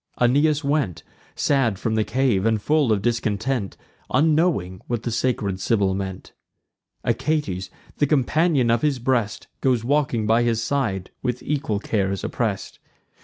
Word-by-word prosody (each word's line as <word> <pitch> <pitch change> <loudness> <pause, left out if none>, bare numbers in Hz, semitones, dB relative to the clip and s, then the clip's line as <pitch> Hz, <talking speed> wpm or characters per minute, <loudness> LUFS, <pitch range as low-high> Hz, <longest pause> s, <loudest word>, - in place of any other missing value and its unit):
Aeneas 145 +5 +3
went 140 - 0 0.3
Sad 130 -8 +1
from 110 +3 -2
the 110 0 +2
cave, 120 -5 +1
and 110 0 +2
full 145 +1 +2
of 100 -2 +1
discontent, 115 -1 -1 0.3
Unknowing 150 - +2
whom 120 -1 -1
the 120 - -4
sacred 110 -5 -1
Sibyl 100 -1 +1
meant. 95 -1 -5 0.7
Achates, 130 - -1 0.3
the 145 - +2
companion 145 -2 +2
of 115 - +2
his 150 -3 +1
breast, 120 -3 -1 0.2
Goes 125 -4 +2
grieving 130 -4 +1
by 115 +2 +3
his 120 -2 +1
side, 115 -8 -1
with 125 0 -2
equal 135 -8 -1
cares 100 -2 -1
oppress'd. - - -3
120 Hz, 140 wpm, -23 LUFS, 100-140 Hz, 0.7 s, Aeneas